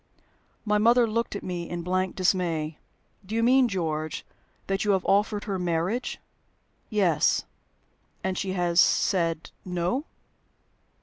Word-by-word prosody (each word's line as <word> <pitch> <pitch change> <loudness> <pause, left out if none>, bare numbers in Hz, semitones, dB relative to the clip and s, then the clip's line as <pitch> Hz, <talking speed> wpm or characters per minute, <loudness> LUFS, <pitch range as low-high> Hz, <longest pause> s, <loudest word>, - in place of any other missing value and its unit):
My 210 -1 +2
mother 235 +3 +5
looked 230 0 -2
at - - -5
me 175 -2 -4
in 175 -1 -4
blank 185 +1 -1
dismay. 170 -5 0 0.4
"Do 205 +4 -6
you 230 - +2
mean, 255 +1 +5
George, 160 -6 -3 0.4
that 195 0 -1
you 205 -1 +3
have 190 - 0
offered 205 +1 +2
her 195 -3 -3
marriage?" 180 +8 -1 0.7
"Yes." 185 -8 +2 0.8
"And 190 0 -1
she 190 0 -2
has 175 -2 +1
said 165 -4 +1
No?" 180 - -1
185 Hz, 130 wpm, -26 LUFS, 170-210 Hz, 0.8 s, mother